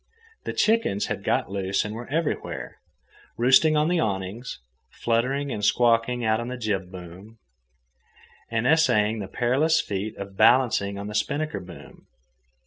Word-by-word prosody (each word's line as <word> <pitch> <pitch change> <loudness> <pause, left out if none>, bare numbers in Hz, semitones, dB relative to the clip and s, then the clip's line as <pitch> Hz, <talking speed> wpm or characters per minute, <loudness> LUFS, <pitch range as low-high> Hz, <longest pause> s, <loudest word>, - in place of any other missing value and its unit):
The - - -3
chickens 220 - +1
had - - -9
got - - 0
loose 100 0 -1
and 105 - -5
were 115 +2 -7
everywhere, 160 +2 -3 0.6
roosting 130 +6 +5
on 150 +1 +2
the 175 0 +1
awnings, 100 - -3 0.3
fluttering 130 +5 -1
and 105 -3 -4
squawking 120 +2 +2
out 110 0 +2
on 120 - -4
the 125 0 -5
jib 100 -6 -2
boom, 95 +4 -11 1.1
and 115 0 -1
essaying 115 -8 +3
the 100 - -5
perilous 130 - +2
feat 105 +1 -4
of 100 -1 -8
balancing 110 -5 +3
on 100 - -6
the 105 - -6
spinnaker 145 +3 -1
boom. 90 -2 -13
115 Hz, 145 wpm, -25 LUFS, 100-130 Hz, 1.1 s, roosting